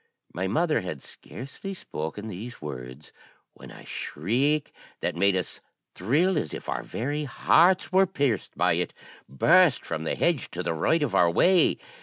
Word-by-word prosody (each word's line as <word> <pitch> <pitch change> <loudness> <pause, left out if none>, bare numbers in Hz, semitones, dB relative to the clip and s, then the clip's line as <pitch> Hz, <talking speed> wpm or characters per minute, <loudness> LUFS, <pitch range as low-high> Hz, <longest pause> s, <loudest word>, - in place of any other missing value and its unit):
My 95 +2 -2
mother 155 - +1
had 80 -7 -6
scarcely 165 +9 -9
spoken 80 - -6
these 110 +4 -7
words, 65 -1 -8 0.4
when - - -13
a - - -13
shriek, 135 - -1 0.3
that - - -1
made 100 +2 +3
us 90 -2 -3 0.3
thrill 155 - +1
as 75 - -4
if - - -9
our - - -2
very 145 +5 -3
hearts 175 +7 +3
were 190 +1 +4
pierced 140 - -1
by - - +3
it, - - -2 0.3
burst 160 - +4
from 80 - -4
the 80 - -1
hedge 170 -7 0
to 90 - -3
the 85 - -1
right 150 - +1
of 130 -9 -2
our 90 -3 +4
way. 180 - +4
115 Hz, 165 wpm, -26 LUFS, -, 0.4 s, were